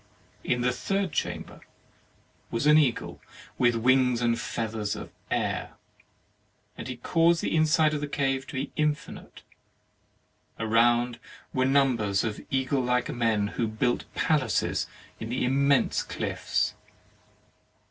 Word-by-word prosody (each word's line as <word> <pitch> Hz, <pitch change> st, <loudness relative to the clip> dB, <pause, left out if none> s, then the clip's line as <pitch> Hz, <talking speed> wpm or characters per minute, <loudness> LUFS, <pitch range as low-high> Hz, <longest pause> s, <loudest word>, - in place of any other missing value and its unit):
In 125 Hz, -, 0 dB
the 125 Hz, +1 st, +2 dB
third 195 Hz, +6 st, -1 dB
chamber 85 Hz, -, -4 dB, 0.9 s
was 115 Hz, +4 st, -2 dB
an 150 Hz, +1 st, +7 dB
eagle 135 Hz, -6 st, -1 dB, 0.4 s
with 120 Hz, -1 st, +4 dB
wings 125 Hz, +1 st, +3 dB
and 115 Hz, -1 st, +1 dB
feathers 110 Hz, -2 st, -3 dB
of -, -, -8 dB, 0.2 s
air; -, -, -1 dB, 1.0 s
he 130 Hz, -1 st, -6 dB
caused 165 Hz, +6 st, +2 dB
the -, -, 0 dB
inside 155 Hz, 0 st, +3 dB
of 150 Hz, -, -2 dB
the 150 Hz, -, -2 dB
cave 135 Hz, -2 st, -1 dB
to -, -, -8 dB
be 135 Hz, +2 st, -3 dB
infinite; 150 Hz, -1 st, -3 dB, 1.1 s
around 120 Hz, +2 st, +2 dB, 0.3 s
were 130 Hz, 0 st, +2 dB
numbers 125 Hz, -8 st, +2 dB
of 110 Hz, -2 st, -3 dB
eagle 135 Hz, 0 st, 0 dB
like 125 Hz, 0 st, 0 dB
men, 110 Hz, -4 st, +1 dB
who 115 Hz, -, -1 dB
built 120 Hz, +3 st, -1 dB
palaces 145 Hz, -8 st, +1 dB, 0.3 s
in 110 Hz, -, -5 dB
the 125 Hz, +1 st, -1 dB
immense 140 Hz, +2 st, +2 dB
cliffs. -, -, -2 dB
125 Hz, 125 wpm, -27 LUFS, 115-140 Hz, 1.1 s, an